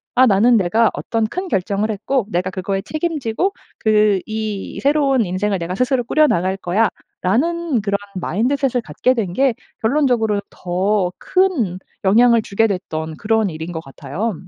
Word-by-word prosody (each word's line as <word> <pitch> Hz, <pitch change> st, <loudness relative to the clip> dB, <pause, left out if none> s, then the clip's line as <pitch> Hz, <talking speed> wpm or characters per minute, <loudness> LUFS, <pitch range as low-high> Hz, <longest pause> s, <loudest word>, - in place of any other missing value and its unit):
'아 255 Hz, -, +6 dB
나는 225 Hz, +4 st, +4 dB
내가 215 Hz, +4 st, +2 dB
어떤 225 Hz, -1 st, -1 dB
큰 365 Hz, -, -4 dB
결정을 200 Hz, -, -1 dB
했고 220 Hz, +2 st, -1 dB
내가 185 Hz, -1 st, -1 dB
그거에 195 Hz, +1 st, -2 dB
책임지고 310 Hz, -, -1 dB, 0.3 s
그 210 Hz, -2 st, +3 dB
이 215 Hz, -2 st, -4 dB
새로운 275 Hz, -4 st, +2 dB
인생을 195 Hz, +2 st, -1 dB
내가 170 Hz, 0 st, -4 dB
스스로 255 Hz, +2 st, +1 dB
꾸려나갈 190 Hz, -, +2 dB
거야.'라는 230 Hz, -, -1 dB
그런 200 Hz, -1 st, 0 dB, 0.2 s
마인드셋을 245 Hz, +7 st, 0 dB
갖게 220 Hz, +11 st, +1 dB
된 215 Hz, -8 st, -2 dB
게 265 Hz, +3 st, +2 dB, 0.3 s
결론적으로 225 Hz, -5 st, +2 dB
더 185 Hz, +1 st, 0 dB
큰 305 Hz, -, +1 dB, 0.2 s
영향을 230 Hz, +4 st, +5 dB
주게 220 Hz, +2 st, +1 dB
됐던 160 Hz, -5 st, -4 dB
그런 220 Hz, -2 st, +1 dB
일인 160 Hz, +2 st, -6 dB
것 160 Hz, -, -4 dB
같아요. 150 Hz, +11 st, -4 dB
215 Hz, 315 characters per minute, -19 LUFS, 190-250 Hz, 0.3 s, 아